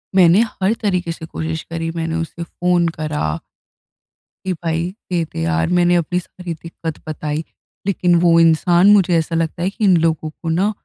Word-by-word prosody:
मैंने 180 Hz, +2 st, +6 dB, 0.2 s
हर 195 Hz, +4 st, +3 dB
तरीके 180 Hz, -5 st, 0 dB
से 165 Hz, -1 st, -7 dB
कोशिश 160 Hz, 0 st, -4 dB
करी 165 Hz, 0 st, -3 dB
मैंने 165 Hz, 0 st, -2 dB
उसे 165 Hz, +1 st, -4 dB
फ़ोन 175 Hz, 0 st, +1 dB
करा 155 Hz, -, -2 dB, 1.2 s
कि 190 Hz, -, 0 dB
भाई 165 Hz, 0 st, -2 dB, 0.2 s
दे 175 Hz, -2 st, +1 dB
दे -, -, -3 dB
यार 80 Hz, 0 st, +1 dB
मैंने 175 Hz, 0 st, +4 dB
अपनी 175 Hz, +1 st, 0 dB
सारी 180 Hz, -1 st, -7 dB
दिक्कत 165 Hz, 0 st, -7 dB
बताई। 155 Hz, 0 st, -3 dB, 0.4 s
लेकिन 180 Hz, -3 st, +2 dB
वो 170 Hz, -1 st, +5 dB
इंसान 170 Hz, +3 st, +4 dB
मुझे 185 Hz, -4 st, +4 dB
ऐसा 165 Hz, +1 st, -1 dB
लगता 165 Hz, +1 st, -1 dB
है 185 Hz, -, +1 dB
कि 205 Hz, -, -6 dB
इन 190 Hz, -4 st, +5 dB
लोगों 160 Hz, -1 st, 0 dB
को 165 Hz, +2 st, -7 dB
न 185 Hz, +6 st, +2 dB
170 Hz, 175 wpm, -19 LUFS, 160-180 Hz, 1.2 s, मैंने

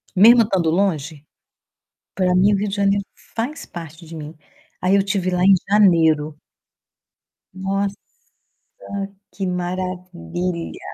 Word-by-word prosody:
Mesmo 230 Hz, +5 st, +8 dB
estando 190 Hz, -6 st, 0 dB
longe, 160 Hz, -5 st, -1 dB, 0.9 s
pra 180 Hz, -1 st, +1 dB
mim 195 Hz, +3 st, +4 dB
o -, -, +2 dB
Rio 205 Hz, +2 st, -1 dB
de 195 Hz, -, -3 dB
Janeiro 200 Hz, 0 st, +1 dB, 0.3 s
faz 245 Hz, +7 st, -3 dB
parte 165 Hz, -1 st, -10 dB
de 165 Hz, +1 st, -10 dB
mim. 155 Hz, 0 st, -8 dB, 0.5 s
Aí 185 Hz, +2 st, +3 dB
eu -, -, +5 dB
estive 195 Hz, -2 st, 0 dB
lá 180 Hz, 0 st, +1 dB
em 195 Hz, +1 st, +7 dB, 0.2 s
janeiro. 160 Hz, -7 st, +3 dB, 1.1 s
Nossa, 195 Hz, +1 st, -2 dB, 1.4 s
que 195 Hz, -1 st, -3 dB
maravilha! 180 Hz, -, -4 dB
185 Hz, 120 wpm, -21 LUFS, 170-200 Hz, 1.4 s, Mesmo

